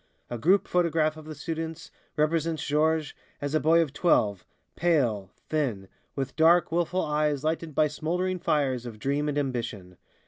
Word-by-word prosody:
A 120 - -3
group 185 - +3
photograph 165 -3 +1
of 155 -1 -11
the 155 0 -7
students 165 +2 -5 0.3
represents 160 0 0
Georges 155 0 +1 0.3
as 145 +1 -3
a 155 - +3
boy 165 +2 +4
of 145 -4 -7
twelve, 105 - +2 0.3
pale, 125 - +1 0.2
thin, 120 -11 -1 0.3
with 135 -1 -3
dark, 165 +1 +4
wilful 175 +2 0
eyes 150 -1 0
lighted 160 -1 -2
by 155 - +4
smouldering 180 +5 -2
fires 130 -7 0
of 115 -2 -8
dream 140 +5 -1
and 145 - -2
ambition. 115 -10 -3
155 Hz, 160 wpm, -27 LUFS, 135-165 Hz, 0.3 s, boy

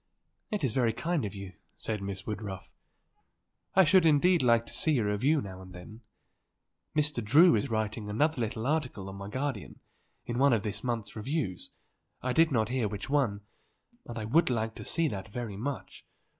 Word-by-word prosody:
"It 210 -6 -2
is 125 -5 +1
very 120 -4 +2
kind 155 +2 -1
of 100 - -5
you," 100 -1 -8 0.2
said 110 -2 -4
Miss 100 -1 -5
Woodruff. 105 -3 -6 1.0
"I 190 - +8
should 180 +2 +5
indeed 165 +3 +4
like 115 -2 +4
to - - -8
see 155 -3 +2
a 115 - +1
review 130 +9 +2
now 95 -2 -8
and 95 -1 -12
then. 100 +6 -11 0.9
Mr. 150 -5 +1
Drew 150 - +6
is 105 - -1
writing 110 -1 -2
another 145 +6 +1
little 110 0 -2
article 130 -10 -1
on 95 - -8
my 100 0 -7
guardian, 130 -2 -4 0.5
in 120 +1 -3
one 140 -1 +5
of 110 -4 +1
this 105 -1 -4
month's 115 -5 -3
reviews, 110 - -3 0.5
I 130 0 -2
did 165 +1 +4
not 110 -4 +1
hear 125 -3 0
which 105 +7 -6
one; 125 -9 +1 0.7
and 120 - -6
I 110 - -3
would 160 +9 +3
like 115 -2 -1
to - - -7
see 165 0 +1
that 95 -3 -5
very 110 -1 -5
much. 130 +6 -5
115 Hz, 185 wpm, -30 LUFS, 105-145 Hz, 1.0 s, I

